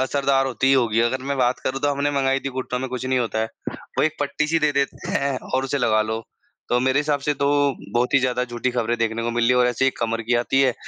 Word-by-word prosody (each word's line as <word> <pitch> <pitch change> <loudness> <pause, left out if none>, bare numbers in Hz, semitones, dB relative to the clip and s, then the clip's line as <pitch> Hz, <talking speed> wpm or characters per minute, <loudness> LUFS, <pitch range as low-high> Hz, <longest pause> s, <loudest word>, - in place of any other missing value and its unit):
असरदार 135 0 +1
होती 130 0 -1
ही 135 - +5
होगी। 115 -4 +3
अगर 125 +3 0
मैं 140 - 0
बात 125 0 +2
करूँ 135 +1 -2
तो 145 - +2
हमने 140 +1 0
मँगाई 135 -1 +1
थी 135 - -3
घुटनों 125 -1 -3
में 130 - -3
कुछ 125 0 -4
नहीं 130 0 +1
होता 115 -2 -1
है। 110 - 0 0.5
वो - - +4
एक 155 0 -1
पट्टी 145 +1 0
सी 165 +2 +2
दे 150 - +1
देते 140 -1 -2
हैं 140 -1 0 0.2
और 130 +1 +1
उसे 140 +2 -1
लगा 110 -4 +3
लो। 110 +1 -3 0.5
तो 125 - +2
मेरे 130 +2 +2
हिसाब 145 -1 0
से 150 +2 0
तो 140 0 0 0.5
बहुत 125 +3 +1
ही - - +7
ज़्यादा 125 -1 0
झूठी 120 +1 -2
ख़बरें 120 -1 -1
देखने 115 0 -1
को 120 - -1
मिली 120 +1 +2
और 125 0 +4
ऐसे 125 +2 0
ही - - +5
एक - - -6
कमर 115 0 -1
की 120 +2 0
आती 130 +3 +1
है 130 -3 +2
130 Hz, 275 wpm, -22 LUFS, 120-140 Hz, 0.5 s, ही